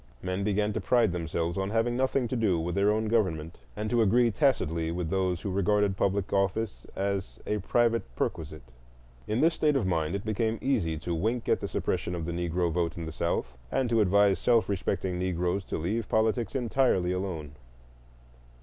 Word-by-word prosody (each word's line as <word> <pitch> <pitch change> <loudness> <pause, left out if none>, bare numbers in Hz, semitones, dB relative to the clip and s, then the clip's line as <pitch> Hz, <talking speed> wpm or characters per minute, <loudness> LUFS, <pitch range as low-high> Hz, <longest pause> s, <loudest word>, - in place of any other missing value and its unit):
Men 95 +2 -2
began 105 +1 +1
to - - -2
pride 120 -5 +3
themselves 85 +1 -2
on 95 0 -1
having 115 +2 +1
nothing 130 0 +1
to 125 - -3
do 105 -8 +2
with 85 +2 -2
their 100 +2 +3
own 110 +1 0
government, 90 -8 0 0.2
and 105 +1 -3
to 120 -1 +3
agree 115 +3 +4
tacitly 85 - +1
with 85 -1 -3
those 95 -2 0
who 100 - -3
regarded 100 +1 +2
public 100 0 0
office 100 +2 -1
as 100 0 -2
a 105 - -1
private 115 +3 +2
perquisite. 75 -1 -3 0.6
In 110 +3 0
this 165 +2 +4
state 150 -2 +2
of 130 -7 +1
mind 85 -1 0
it 100 - -4
became 110 +1 0
easy 95 - 0
to 85 +3 -4
wink 110 +8 -1
at - - +2
the - - -4
suppression 90 - -2
of 85 -2 -4
the 85 - -3
Negro 85 0 -1
vote 85 0 -1
in 85 - -4
the 80 - -5
South, 65 -7 -2
and 125 -3 0
to 115 -1 +4
advise 100 0 +4
self 115 -2 +3
respecting 95 -2 -2
Negroes 90 +1 -1
to - - -3
leave 105 +8 -2
politics 110 +1 +1
entirely 120 -7 +2
alone. 90 -6 -3
100 Hz, 190 wpm, -28 LUFS, 85-115 Hz, 0.6 s, agree